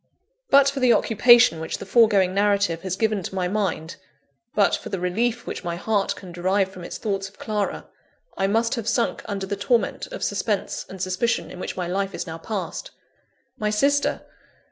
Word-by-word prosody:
But 275 0 +6
for 280 0 -1
the 250 -2 +5
occupation 230 -6 +5
which 160 - -4
the - - -8
foregoing 200 -4 +4
narrative 200 -4 +2
has 185 -1 -3
given 215 -1 0
to 190 - -6
my 180 -1 0
mind; 180 -5 -2 0.6
but 200 -1 +4
for - - -7
the 195 - -3
relief 225 +7 -1
which - - -5
my 170 -1 -3
heart 200 +3 0
can 185 -3 -11
derive 185 +3 +1
from 185 -2 -11
its - - -6
thoughts 195 -2 -2
of 195 - -25
Clara, 210 -2 -2 0.5
I 195 - +1
must 225 +3 +1
have 230 -4 -3
sunk 235 +1 0
under 195 -2 -3
the 200 - -3
torment 225 +4 0
of - - -7
suspense - - -2
and 190 - -9
suspicion 185 +6 -1
in 180 - -9
which - - -5
my 180 - -1
life 195 +2 -2
is - - -4
now 165 -1 -7
passed. 210 - -5 0.7
My 210 -1 0
sister! 280 +7 +1
200 Hz, 190 wpm, -24 LUFS, 185-225 Hz, 0.7 s, But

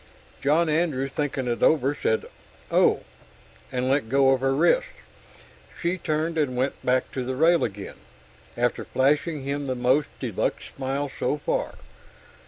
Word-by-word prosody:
John 155 +4 +3
Andrew, 150 -4 +1
thinking 135 -2 -2
it 120 -1 -2
over, 145 -3 +3
said 110 -6 0 0.5
"Oh," - - +4 0.7
and 125 -1 -1
let 135 -4 +1
go 135 +1 +4
of 130 -1 +2
her 135 0 +1
wrist. - - +3 0.9
She 175 +2 -1
turned 155 +1 -1
and 130 -5 0
went 130 +2 -1
back 125 0 +1
to 130 - -3
the 130 +1 -3
rail 165 +4 +4
again, 100 -2 -5 0.6
after 120 0 0
flashing 145 +2 +1
him 140 +1 -3
the 130 - -1
most 130 +4 +2
de - - -3
luxe - - -1
smile 135 +1 -2
so 150 - 0
far. 145 - -2
140 Hz, 155 wpm, -25 LUFS, 130-150 Hz, 0.9 s, Oh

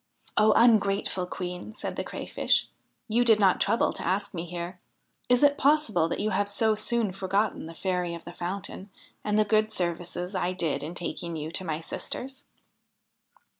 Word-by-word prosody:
' - - -38
O 215 +1 +5
ungrateful 200 -5 +3
Queen! 180 +3 -6
' - - -23
said - - -4
the - - -2
Crayfish, - - 0 0.2
' - - -48
you 230 +3 +3
did 225 -3 +5
not 190 -3 +4
trouble 230 - +2
to - - -5
ask 200 +3 -1
me 170 -1 -4
here. 175 +1 -6 0.5
Is 250 +2 +4
it 285 0 +5
possible 270 - +3
that - - -2
you 215 +1 0
have 205 +1 0
so 220 +1 +2
soon 215 0 0
forgotten 195 -1 -1
the 165 - -10
Fairy 180 -1 -1
of 170 - -11
the 170 - -8
Fountain 190 +2 -5 0.3
and 210 0 +1
the 215 - +4
good 215 +1 +2
services 175 0 -3
I 185 -1 0
did 170 -5 -1
in 160 +4 -5
taking 170 -1 -4
you 155 0 -4
to 185 - -3
my 155 -3 -2
sisters. 265 - -5
195 Hz, 190 wpm, -27 LUFS, 175-215 Hz, 0.5 s, O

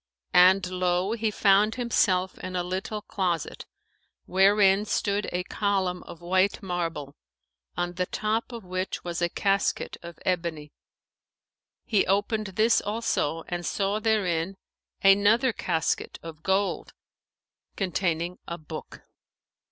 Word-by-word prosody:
And 185 +1 +6
lo! 180 +1 0
he 225 -1 0
found 210 +1 +3
himself 190 -7 +1
in 185 0 -6
a 180 - 0
little 190 +4 -4
closet, 180 -7 -2 0.6
wherein 195 +1 +4
stood 205 -1 -1
a 180 0 -1
column 190 -2 -1
of 170 - -10
white 185 +4 +1
marble, 165 -6 -3 0.6
on 175 0 -1
the 180 0 -2
top 220 +3 -1
of 235 -3 -7
which 185 +1 -3
was 175 0 -4
a 170 - +2
casket 195 +2 0
of 170 -1 -10
ebony; 165 -5 -2 1.1
he 210 -5 +2
opened 205 +2 +1
this 225 +2 +4
also 205 -7 -1
and 175 0 -3
saw 200 +3 0
therein 195 -5 0 0.5
another 205 +5 +5
casket 165 -5 -1
of 160 -2 -9
gold, 190 +3 0 0.8
containing 180 -2 -1
a 170 - -4
book. 155 -1 -9
185 Hz, 120 wpm, -26 LUFS, 175-205 Hz, 1.1 s, And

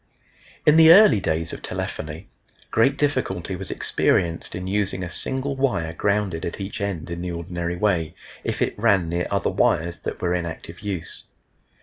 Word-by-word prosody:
In 150 +1 +6
the 160 0 +9
early 185 - +8
days 80 -2 -1
of - - -7
telephony 80 +5 -5 0.4
great 135 +5 +3
difficulty 130 - -1
was - - -7
experienced 85 -2 0
in 90 0 -5
using 100 -1 -1
a 90 - -5
single 135 +8 -2
wire 120 -12 0
grounded 100 -3 0
at 85 - -4
each 100 +1 -5
end 90 -5 -3
in 85 0 -4
the 90 0 -3
ordinary 85 0 -4
way, 85 -4 0 0.3
if - - -1
it - - -3
ran 100 -6 +3
near 85 +1 -1
other - - 0
wires 85 +1 +1
that - - -5
were 90 -1 0
in 90 -1 -1
active 80 - -8
use. 95 -5 -6
90 Hz, 175 wpm, -23 LUFS, 85-105 Hz, 0.4 s, the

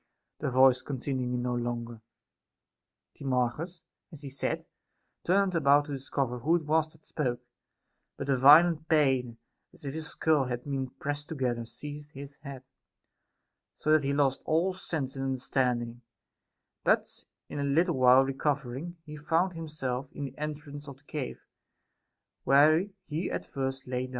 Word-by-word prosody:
The 145 - -1
voice 130 0 +5
continuing 130 -2 -2
no 125 0 -1
longer, 120 -1 -3 1.1
Timarchus 135 +7 -2 0.3
(as 155 -3 -11
he 140 - -5
said) 135 +1 -2 0.6
turned 195 +1 +2
about 145 -3 +4
to 145 - -8
discover 135 -2 -2
who 160 +8 +3
it 170 - 0
was 155 +1 +2
that 155 0 -22
spoke; 125 -5 -2 0.8
but 140 - -5
a 140 - +3
violent 155 +4 +7
pain, 130 -7 +2 0.3
as - - -15
if 135 - -3
his 160 0 -3
skull 155 -5 +2
had 120 -1 -4
been 135 -2 -3
pressed 145 +3 -5
together, 125 -6 -1
seized 145 +4 -9
his 140 0 -9
head, 140 -3 -9 1.1
so 155 - 0
that 155 -1 +6
he 135 - 0
lost 140 -2 +2
all 170 +4 +2
sense 155 -7 -4
and 135 - -3
understanding: 125 -2 -1 0.8
but - - +1 0.2
in - - -5
a - - 0
little 165 +5 +2
while 130 +1 +7
recovering, 140 +3 -2
he 150 -1 -8
found 165 +4 +1
himself 150 -6 -4
in 145 - -4
the 135 -1 -8
entrance 150 -1 -6
of 140 -2 -9
the 135 - -25
cave, 145 -3 -5 1.0
where 155 +7 +5 0.2
he 160 +1 -3
at - - -3
first 135 0 -3
lay 125 0 -2
down. - - -14
140 Hz, 155 wpm, -29 LUFS, 130-155 Hz, 1.1 s, violent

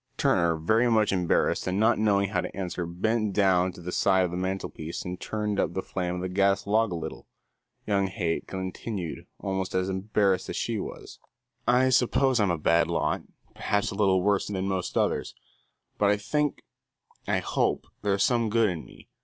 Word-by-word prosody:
Turner, 85 -3 +2
very 110 +10 +2
much 110 -2 +3
embarrassed, 90 -1 +1
and 95 +2 0
not 110 +1 +3
knowing 100 -2 +2
how 90 -3 0
to - - -7
answer, 90 -2 -3
bent 110 +4 0
down 95 -2 +3
to 90 - -12
the 90 +1 -5
side 95 0 +3
of 85 - -4
the - - -4
mantelpiece 90 -3 -4
and 90 0 -5
turned 105 -2 -2
up - - 0
the 95 - -2
flame 90 -1 -3
of 90 - -4
the 95 - -2
gas 100 +1 +2
log 110 +1 +2
a - - -2
little. 80 -1 -7 0.6
Young 100 -2 +1
Haight 90 -4 -2
continued, 95 -1 -5
almost 95 -2 -3
as 95 +1 +1
embarrassed 95 -1 0
as - - -4
she: 115 -4 -1 0.9
"I 125 +2 +4
suppose 130 0 +3
I'm 100 -3 +3
a 85 - +1
bad 85 +2 +3
lot, 85 -2 0 0.3
perhaps 105 0 -1
a - - -6
little 95 -3 +3
worse 100 0 +2
than 95 -2 -2
most 95 -2 -2
others, - - 0 0.6
but 100 - +4
I 105 - +3
think 150 +8 -1 0.6
I - - +2
hope - - 0 0.2
there's 100 -1 +1
some 115 -3 +2
good 115 0 +3
in 80 -3 -5
me. - - -16
95 Hz, 185 wpm, -27 LUFS, 90-105 Hz, 0.9 s, I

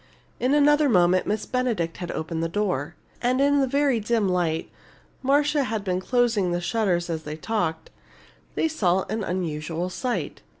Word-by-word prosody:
In 260 +3 +2
another 295 0 +4
moment 180 -3 +3
Miss 210 +1 -1
Benedict 230 -10 -1
had 175 -2 -6
opened 160 +1 -3
the 165 - -1
door. 175 -6 -2 0.3
And 250 +1 +1
in 285 +1 +4
the 270 - +2
very 275 -2 +2
dim 220 -1 +1
light 175 -3 -1 0.5
(Marcia 285 +1 +2
had 220 -3 -3
been 185 -1 -1
closing 230 -5 +1
the 175 - 0
shutters 175 -2 0
as 165 -2 -3
they 150 0 -6
talked) 165 -4 -2 0.6
they - - +2
saw 190 - +1
an 220 -1 -1
unusual 170 -1 -3
sight. 250 +5 -3
205 Hz, 165 wpm, -25 LUFS, 175-255 Hz, 0.6 s, another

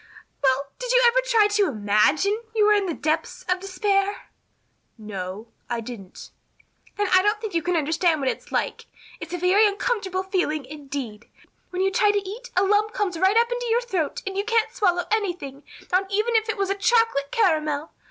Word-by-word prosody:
Well, 275 +1 +1
did - - -3
you - - +5
ever 480 +1 +5
try 460 -4 +4
to 415 -1 +2
imagine 270 - +2
you 425 -1 +4
were 425 - +5
in 405 -2 +1
the 335 - -2
depths 310 +2 -2
of 365 0 0
despair?" 395 +1 -1 0.7
"No, 205 0 -7 0.2
I 240 -1 -1
didn't." 220 -5 -10 0.7
"Then 410 0 +1
I 370 - +7
don't 415 +2 +1
think 430 -3 -6
you 335 - +1
can 355 +2 -1
understand 320 +1 +1
what 270 - -2
it's - - -3
like. - - -2 0.3
It's - - -8
a 355 - -2
very 375 +5 +4
uncomfortable 400 -3 -2
feeling 360 -7 -1
indeed. 270 -6 -7 0.4
When 365 +1 -2
you 385 - +2
try 415 +2 +3
to 405 -1 0
eat 480 +5 -8
a 375 - +5
lump 420 +2 +2
comes 370 -5 -2
right 380 +4 +3
up 470 +1 +3
in 485 - -1
your 465 +2 +2
throat 375 -11 -3
and 390 0 -4
you 400 - 0
can't 455 0 +1
swallow 360 -7 +1
anything, 355 -10 -2 0.3
not 380 +2 +1
even 435 +4 +1
if 440 0 +2
it 440 - -1
was 395 -1 0
a - - 0
chocolate 400 - +2
caramel. 310 -7 0
380 Hz, 195 wpm, -24 LUFS, 300-420 Hz, 0.7 s, I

